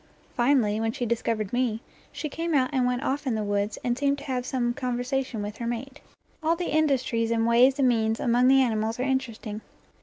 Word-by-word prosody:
Finally, 240 -4 +2
when 225 0 0
she 245 +1 -3
discovered 225 -2 -1
me, 240 -3 0 0.3
she 305 - -4
came 330 +2 -2
out 255 -1 +2
and 255 -2 +2
went 250 0 -1
off 280 +1 -2
in 240 - +1
the 215 - -1
woods, 205 +1 -1
and 240 -1 0
seemed 280 +2 +1
to - - -9
have 255 -2 -3
some 240 -2 0
conversation 250 -2 -2
with 205 +1 -6
her 235 - -4
mate. 255 +4 -5 0.4
All 320 +1 +2
the 345 -2 -3
industries 260 -7 +1
and 225 -1 +1
ways 245 +4 +5
and 270 -2 +3
means 225 -2 +1
among 245 +1 +3
the 270 0 +6
animals 225 -1 -1
are - - 0
interesting. 240 -5 -3
245 Hz, 210 wpm, -26 LUFS, 225-270 Hz, 0.4 s, the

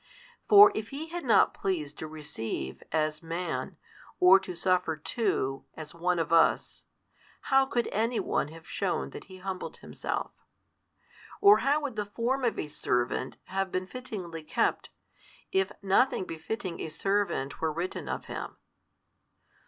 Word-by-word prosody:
For 410 -1 +10
if 220 +1 -4
He 305 +4 -6
had 345 +1 -5
not 240 - +5
pleased 155 -7 -3
to 160 - -5
receive, 115 - -5
as 155 -1 0
Man, 165 -5 -4 0.4
or 185 +2 +8
to 190 -2 -7
suffer 180 -2 +1
too, 140 - -1
as 155 0 -8
one 175 +1 0
of 165 0 -1
us, 165 - +3 0.7
how 270 0 +6
could 240 -2 0
any 230 +3 +1
one - - 0
have 160 +1 -13
shewn 195 -2 -2
that - - -9
He 190 -1 -12
humbled 185 0 -5
Himself? - - -4 1.1
or 410 0 +7
how 290 +2 +2
would 270 -7 -4
the 210 - -1
Form 245 +5 -1
of 235 -4 +1
a - - -2
servant 125 -3 -1
have 195 0 -2
been 185 0 -1
fittingly 190 -8 -7
kept, 155 - 0 0.6
if 385 0 +1
nothing 195 +3 +3
befitting 175 +2 -5
a - - -4
servant 185 -6 -1
were 160 -1 +1
written 170 +4 -4
of - - -3
Him? - - -6
185 Hz, 150 wpm, -29 LUFS, 160-230 Hz, 1.1 s, For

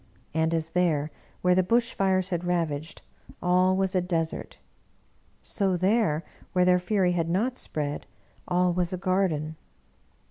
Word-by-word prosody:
And 160 +1 +1
as 165 -1 -1
there, 160 -4 +1 0.3
where 180 0 +5
the 185 - +4
bush 230 +5 +1
fires 190 -1 +1
had 175 -2 -2
rav 175 -3 0
aged, 145 +3 -7 0.4
all 185 +1 +3
was 190 -1 +1
a 185 - +2
desert, 165 -2 -3 0.9
so 195 -3 0
there, 185 -4 +2 0.3
where 180 -1 +3
their 180 0 +5
fury 185 0 +1
had 165 -2 0
not 230 +9 0
spread, 145 -1 -3 0.4
all 180 0 +2
was 175 -1 0
a 185 - -2
garden. 180 -5 0
180 Hz, 150 wpm, -27 LUFS, 165-185 Hz, 0.9 s, where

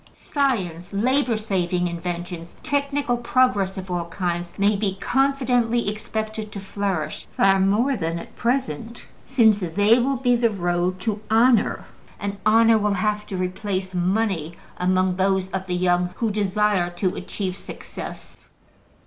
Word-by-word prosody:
Science, 190 - -1
labor 250 +3 +2
saving 180 -4 0
inventions, 170 0 -5
technical 280 -3 0
progress 235 -6 +1
of 190 -1 -6
all 175 -1 -1
kinds, 175 -1 -2
may 205 +1 +3
be 195 -1 -1
confidently 245 -3 +1
expected 215 0 -4
to 200 - -6
flourish 195 -5 -3
far 195 0 +5
more 215 +8 +2
than 165 -5 -2
at - - -10
present, 235 - -2 0.2
since 225 -6 +4
they 205 +6 +3
will 270 +2 +1
be 245 -1 +2
the 235 -1 +3
road 180 -2 -1
to 210 +1 -2
honor, 230 0 +3 0.3
and 200 -1 -3
honor 225 0 +5
will 205 -1 +1
have 210 +2 -1
to 190 - -4
replace 185 +1 -3
money 180 -3 0 0.2
among 185 0 +2
those 190 0 +1
of 190 0 -3
the 180 - -1
young 180 0 +2
who 225 -2 0
desire 205 -2 +1
to 180 +1 -2
achieve 190 -3 -4
success. - - -9
200 Hz, 140 wpm, -23 LUFS, 180-230 Hz, 0.3 s, far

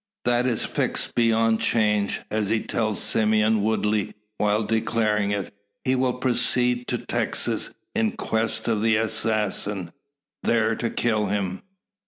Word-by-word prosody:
That 120 +1 +2
is 120 -3 0
fixed - - -2
beyond 115 -1 +3
change, 105 -3 +1
as 105 -2 0
he 110 0 +2
tells 110 -4 -1
Simeon 110 0 +2
Woodley 105 -1 0 0.2
while 105 +1 +2
declaring 110 -1 +1
it. 100 -1 -3 0.3
He 130 - +1
will 130 -1 +1
proceed 125 -1 +1
to - - 0
Texas - - -1 0.2
in 110 -1 +1
quest 110 +1 -1
of 110 -3 +1
the 110 0 +3
assassin 105 -4 -1 0.5
there 115 -1 +2
kill 110 -2 0
him. 95 -2 -2
110 Hz, 130 wpm, -24 LUFS, 105-115 Hz, 0.5 s, beyond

